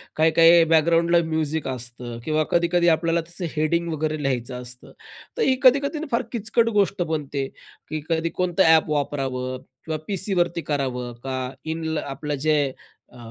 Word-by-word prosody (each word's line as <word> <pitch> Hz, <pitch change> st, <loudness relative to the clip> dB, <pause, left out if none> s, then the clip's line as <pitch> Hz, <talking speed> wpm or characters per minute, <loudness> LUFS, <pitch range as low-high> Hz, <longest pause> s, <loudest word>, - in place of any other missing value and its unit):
काही-काही 165 Hz, +1 st, +6 dB
बॅकग्राऊंडला 165 Hz, +2 st, +3 dB
म्युझिक 160 Hz, -2 st, -2 dB
असतं 120 Hz, -2 st, -6 dB
किंवा 155 Hz, 0 st, +1 dB
कधी-कधी 170 Hz, 0 st, +2 dB
आपल्याला 165 Hz, +1 st, +2 dB
त्याचं 170 Hz, 0 st, -7 dB
हेडिंग 170 Hz, +2 st, 0 dB
वगैरे 155 Hz, 0 st, -2 dB
लिहायचं 125 Hz, -1 st, -2 dB
असतं. 125 Hz, 0 st, -11 dB, 0.5 s
तर -, -, -1 dB
ही 260 Hz, -, +3 dB
कधी-कधी 280 Hz, +4 st, +3 dB
फार 235 Hz, -, +2 dB
किचकट 230 Hz, 0 st, +1 dB
गोष्ट 195 Hz, -1 st, +1 dB
बनते, 145 Hz, -4 st, -2 dB, 0.4 s
की 155 Hz, -1 st, -3 dB
कधी 165 Hz, 0 st, 0 dB
कोणतं 180 Hz, +1 st, +1 dB
अ‍ॅप 160 Hz, -1 st, +5 dB
वापरावं 130 Hz, -3 st, -2 dB, 0.3 s
किंवा 160 Hz, -1 st, -2 dB
पीसीवरती 175 Hz, -4 st, 0 dB
करावं 125 Hz, -3 st, -2 dB
का 135 Hz, -1 st, -3 dB, 0.3 s
इन 160 Hz, 0 st, -3 dB
आपलं 145 Hz, +2 st, -4 dB
जे 155 Hz, -1 st, +4 dB, 0.5 s
अ, 125 Hz, -, -16 dB
160 Hz, 145 wpm, -23 LUFS, 140-170 Hz, 0.5 s, काही-काही